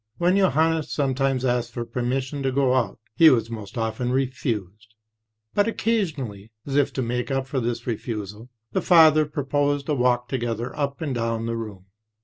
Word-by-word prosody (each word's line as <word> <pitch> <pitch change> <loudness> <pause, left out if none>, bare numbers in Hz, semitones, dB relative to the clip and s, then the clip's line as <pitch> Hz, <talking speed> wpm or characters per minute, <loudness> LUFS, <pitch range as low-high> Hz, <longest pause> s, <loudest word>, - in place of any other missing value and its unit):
When 175 +2 +3
Johannes 160 -4 +2
sometimes 135 -2 0
asked 120 -1 0
for 120 -1 -4
permission 130 +4 -2
to 135 -1 0
go 130 -1 +2
out, 130 -2 0 0.2
he 160 +6 +8
was 115 -4 +2
most 110 +1 -7
often 115 +2 -1
refused; 110 -5 -3 0.6
but 205 +1 +2
occasionally, 145 - -2
as 140 - -4
if 145 -1 +3
to 130 - -1
make 125 +2 -2
up 135 -1 -1
for 135 0 -2
this 120 -1 -3
refusal, 110 -1 -5 0.2
the - - 0
father 155 -3 +6
proposed 145 0 -1
a - - +2
walk 125 -2 +1
together 120 -1 -3
up 140 0 -2
and 145 -4 -2
down 115 -1 -1
the 115 0 -2
room. 105 -5 -7
130 Hz, 170 wpm, -24 LUFS, 115-145 Hz, 0.6 s, he